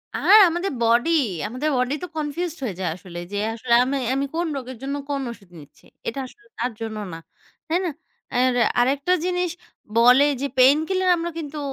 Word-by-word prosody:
আর 425 - +6
আমাদের 345 +4 -2
বডি, 235 +6 +3 0.4
আমাদের 255 +7 -2
বডি 250 +2 0
তো - - -3
কনফিউজড 310 +3 -3
হয়ে 215 -8 -3
যায় 185 - -1
আসলে। 175 -1 -11
যে 205 - -3 0.2
আসলে 235 +1 -1
আমি 275 +2 -1 0.2
আমি 275 +1 0
কোন 340 0 0
রোগের 260 -1 -7
জন্য 275 +1 -2
কোন 280 -1 -1
ঔষুধ 205 -6 -11
নিচ্ছি। 145 - -17 0.2
এটা 230 - -3
আসলে 415 +10 -20
তার 245 +2 -1
জন্য 220 -1 -4 0.2
না। - - -6 0.5
তাই 340 +2 +1
না? - - 0 0.5
আর 255 +1 +3 0.3
আরেকটা 275 +7 +2
জিনিস 360 -1 0 0.5
বলে 250 +4 +6 0.2
যে, - - 0
পেইনকিলার 315 +9 +4
আমরা 340 +1 -3
কিন্তু 305 -2 -6
275 Hz, 180 wpm, -23 LUFS, 235-330 Hz, 0.5 s, আর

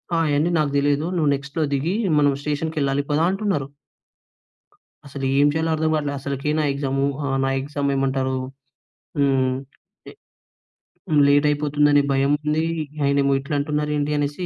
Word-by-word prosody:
ఆహ్, 165 0 +2
అయన్నీ 150 +4 +1
నాకు 150 -2 0
తెలీదు. 145 +1 +1
నువ్వు 155 -3 +2
నెక్స్ట్‌లో 140 +3 -3
దిగి, 160 +8 -1 0.2
మనం 145 -1 +3
స్టేషన్‌కి 155 +2 -3
వెళ్ళాలి 140 0 0
పదా 155 +3 +2
అంటున్నారు. 195 -8 -1 1.4
అసలు 140 0 -5
ఏం 145 - +5
చేయాలో 160 +1 -1
అర్థంకాట్ల. 155 -2 0
అసలకి 140 +1 -3
నా - - +1
ఎగ్జాము 135 -1 -1 0.2
ఆహ్, 135 -1 0
నా 135 - +1
ఎగ్జామ్ 145 0 -4
ఎమ్ 140 - +2
ఏమంటారు? 130 -1 0 0.8
హ్మ్, 135 -2 +2 1.6
లే 150 - +4
లేట్ 145 +1 +4
అయిపోతుందని 145 0 +2
భయం 135 +1 +2
ఉంది. 155 +2 +1 0.4
ఆయనేమో 140 0 +2
ఇట్లా 140 +2 -4
అంటున్నారు 150 +1 -1
ఏంటి 145 +1 -1
అనేసి 145 +5 -2
145 Hz, 145 wpm, -22 LUFS, 140-150 Hz, 1.6 s, ఏం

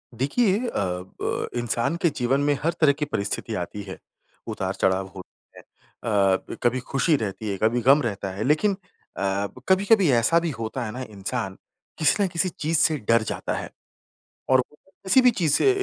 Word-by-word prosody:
देखिए 200 - +1
अ, - - -1 0.5
ब - - -2
इंसान 120 +5 -1
के 170 - +4
जीवन 135 0 0
में 145 0 +2
हर 165 - +1
तरह 155 -3 +6
की 150 +1 -3
परिस्थिति 110 -3 -3
आती 90 +3 -5
है, 95 -1 -8 0.5
उतार-चढ़ाव 95 0 -1
होता 95 - -14
है - - -11
अ, 100 -4 -1
ब - - -6
कभी 120 +1 +2
खुशी 135 +5 +1
रहती 110 -3 -4
है, 100 - -2
कभी 120 +2 +2
गम 135 +5 +5
रहता 100 -6 -3
है। 100 - -3
लेकिन 155 - +2 0.4
अ, - - -4 0.3
ब 125 - -16
कभी-कभी 195 -1 +4
ऐसा 125 +8 +4
भी 170 0 -2
होता 115 +2 -3
है 110 - -5
ना 125 - -6
इंसान, 100 0 -4 0.4
किसी 155 - +3
ना - - +2
किसी 175 +1 +1
चीज़ 160 0 -1
से 155 +1 +3
डर 115 0 +5
जाता - - -3
है, - - -6 0.8
और 130 - +5
वो 150 - -22 0.3
किसी 190 +8 +6
भी 250 - +6
चीज़ 175 -10 0
से 400 - +4
130 Hz, 190 wpm, -24 LUFS, 110-165 Hz, 0.8 s, तरह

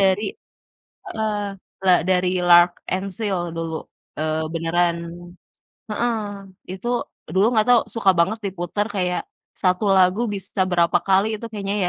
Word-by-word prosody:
dari 195 - +2 0.8
heeh, 215 -1 -1 0.5
la 185 - +6 0.2
dari 180 0 +2
L'Arc-en-Ciel, 175 +1 +2
dulu. 165 -1 -3 0.4
Eee, 155 0 0
beneran 170 +1 +1 0.9
heeh, 235 +2 0 0.6
itu, 190 +5 -6 0.5
dulu 190 +3 +4
nggak 215 -1 +3
tau, 245 -2 +6
suka 200 -4 +4
banget 215 +6 +2
diputar, 190 +2 -2
kayak, 180 -1 0 0.3
1 185 +2 +1
lagu 185 +4 +4
bisa 195 0 -3
berapa 170 -1 +3
kali, 195 +2 +4
itu 230 - -8
kayaknya 200 -1 -3
185 Hz, 120 wpm, -22 LUFS, 175-205 Hz, 0.9 s, la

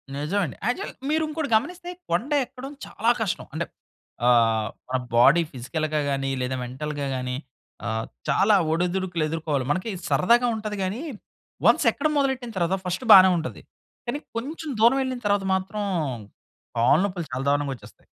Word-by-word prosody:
నిజమండి. 160 +3 -1
యాక్చువల్ 245 - -2 0.2
మీరు 315 +1 +2
ఇంకోటి 305 -2 -3
గమనిస్తే, 350 +9 -1 0.2
కొండ 225 - 0
ఎక్కడం 265 +2 -9
చాలా 230 +3 +1
కష్టం. 210 -5 -2
అంటే 165 +1 -2 0.6
ఆహ్, 115 -3 +4 0.2
మన 130 - +1 0.2
బాడీ 135 +8 +6
ఫిజికల్‌గా 150 +4 -2
గాని, 135 0 -1
లేదా 125 +1 -1
మెంటల్‌గా 145 +3 -4
గాని. 125 0 -3 0.5
ఆహ్, 110 -1 -2 0.2
చాలా 200 +9 +4 0.2
ఒడిదుడుకులు 175 0 0
ఎదుర్కోవాలి. 150 -5 -1
మనకి 185 +8 -1 0.2
సరదాగా 240 +6 +4
ఉంటది 215 -1 -4
గానీ, 200 +8 -2 0.7
వన్స్ - - +4
ఎక్కడం 300 +1 -1
మొదలెట్టిన 265 -4 0
తరువాత 180 +2 +1
ఫస్ట్ 180 +7 -3
బానే 190 -1 +9
ఉంటది. 165 - -5 0.4
కానీ 240 +5 -2 0.2
కొంచెం 305 +6 -5
దూరం 240 +4 +6
ఎళ్ళిన 260 -1 -3
తరువాత 205 -1 +2
మాత్రం 190 +3 -3 1.0
కాళ్ళ 120 +6 +5
నొప్పులు 180 -4 -3
చాలా 130 +2 -2
దారుణంగా 145 -1 +1
ఒచ్చేస్తాయి. 120 - -17
180 Hz, 145 wpm, -25 LUFS, 140-235 Hz, 1.0 s, బానే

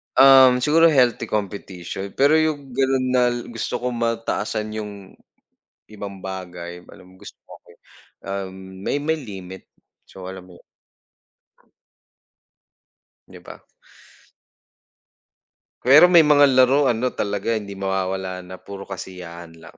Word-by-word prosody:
Um, 130 -2 +7
siguro 165 +2 +5
healthy 125 -5 +2
competition 100 -2 -5
pero 140 +3 +4
yung 145 -4 -2
ganun 135 0 +1
nal 125 -1 +2 0.2
gusto 115 +2 -4
ko 125 0 -2
mataasan 115 -2 -2
yung 105 -1 -5 1.0
ibang 100 -2 -8
bagay 90 -2 -7
alam 95 0 -17
mo - - -19
gus - - -9
okey, - - -17 0.5
uhm, 95 -1 -7
may - - -1
may 160 +1 -1
limit. 95 -5 -10 0.4
So, 95 -1 -11
alam 95 -1 -9
mo 90 - -15
yun. - - -23 2.6
'Di - - -14
ba? - - -12 2.3
Pero 150 +7 +8
may 170 -3 +7
mga 145 -1 +6
laro 130 +2 +4
ano 120 +2 -1
talaga 100 +2 -2
hindi 100 -3 -5
mawawala 95 -1 -3
na 90 +1 -11
puro 100 -1 -10
kasiyahan 85 -3 -9
lang, - - -15
105 Hz, 120 wpm, -21 LUFS, 95-130 Hz, 2.6 s, Pero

